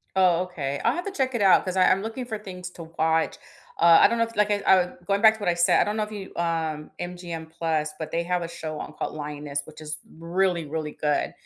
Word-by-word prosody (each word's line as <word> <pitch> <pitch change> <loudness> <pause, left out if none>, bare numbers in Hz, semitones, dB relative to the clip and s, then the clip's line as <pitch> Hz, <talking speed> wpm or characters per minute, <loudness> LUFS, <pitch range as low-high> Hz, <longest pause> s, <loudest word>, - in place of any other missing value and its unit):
Oh, 180 -2 +4
okay, 145 -7 -4
I'll 230 - +3
have 350 +3 -4
to - - -2
check 265 -8 -1
it 235 - 0
out 195 -2 +6
'cause 185 0 -3
I 185 - +5
I'm 190 +1 +3
looking 225 +4 -4
for 220 -3 -4
things 180 -3 -8
to 170 - -9
watch, 160 0 +2 0.4
uh, 170 -1 +8
I - - +8
don't 235 +2 -1
know 230 - +4
if 230 0 -10
like 210 0 +3
I 205 - +2
uh 180 -2 +3
going 200 0 +1
back 220 -1 +8
to 220 - -13
what 205 - -1
I 175 - +3
said 170 0 +4
I - - +4
don't 210 +1 -2
know 215 - 0
if 210 0 -4
you, 200 -2 -7
um, 160 -3 -2
MGM 175 -2 -6
Plus 160 -2 -1
but 160 - -5
they 170 - 0
have 180 0 0
a 170 - -4
show 155 -2 -6
on - - -7
called - - -5
Lioness, 145 -1 -4
which 155 +1 -13
is 155 0 -5 0.2
really, 170 0 0
really 155 0 -4
good, 150 -1 -1
175 Hz, 265 wpm, -25 LUFS, 160-200 Hz, 0.4 s, uh